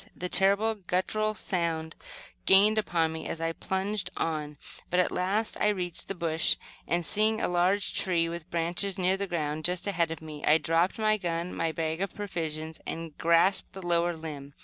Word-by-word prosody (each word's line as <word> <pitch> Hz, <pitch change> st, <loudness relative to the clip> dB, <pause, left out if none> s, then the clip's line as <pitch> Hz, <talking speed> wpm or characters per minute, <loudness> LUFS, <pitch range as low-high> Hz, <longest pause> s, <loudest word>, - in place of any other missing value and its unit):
The 180 Hz, -, -4 dB
terrible, 200 Hz, +4 st, +3 dB
guttural 215 Hz, +2 st, -1 dB
sound 165 Hz, -4 st, -2 dB, 0.5 s
gained 210 Hz, +3 st, +6 dB
upon 165 Hz, -6 st, 0 dB
me 160 Hz, -, -6 dB
as 165 Hz, -, -4 dB
I 165 Hz, 0 st, 0 dB
plunged 190 Hz, +2 st, -2 dB
on, 150 Hz, -2 st, -2 dB, 0.3 s
but 180 Hz, -, +2 dB
at 180 Hz, -, +3 dB
last 200 Hz, +5 st, 0 dB
I -, -, +4 dB
reached 180 Hz, -5 st, -2 dB
the 195 Hz, -, -4 dB
bush, 165 Hz, -2 st, +1 dB, 0.3 s
and, 175 Hz, 0 st, 0 dB
seeing 215 Hz, +7 st, +2 dB
a -, -, +1 dB
large 180 Hz, +3 st, +1 dB
tree 170 Hz, -3 st, +2 dB
with 170 Hz, 0 st, -6 dB
branches 175 Hz, +3 st, -1 dB
near 185 Hz, 0 st, +2 dB
the 200 Hz, 0 st, -3 dB
ground, 155 Hz, -3 st, -2 dB
just 180 Hz, +1 st, 0 dB
ahead 170 Hz, -5 st, +1 dB
of 165 Hz, -, -5 dB
me, 155 Hz, -2 st, -9 dB
I 155 Hz, -, +6 dB
dropped 165 Hz, +3 st, +1 dB
my 215 Hz, -1 st, +2 dB
gun 170 Hz, -2 st, -2 dB
and 165 Hz, -1 st, 0 dB
bag 160 Hz, +1 st, -2 dB
of 195 Hz, -, -3 dB
provisions, 160 Hz, -6 st, -4 dB
and 165 Hz, -2 st, -5 dB
grasped 170 Hz, +4 st, +3 dB
the 190 Hz, -2 st, -8 dB
lower 170 Hz, 0 st, +2 dB
limb. 145 Hz, -3 st, -8 dB
175 Hz, 185 wpm, -28 LUFS, 165-195 Hz, 0.5 s, gained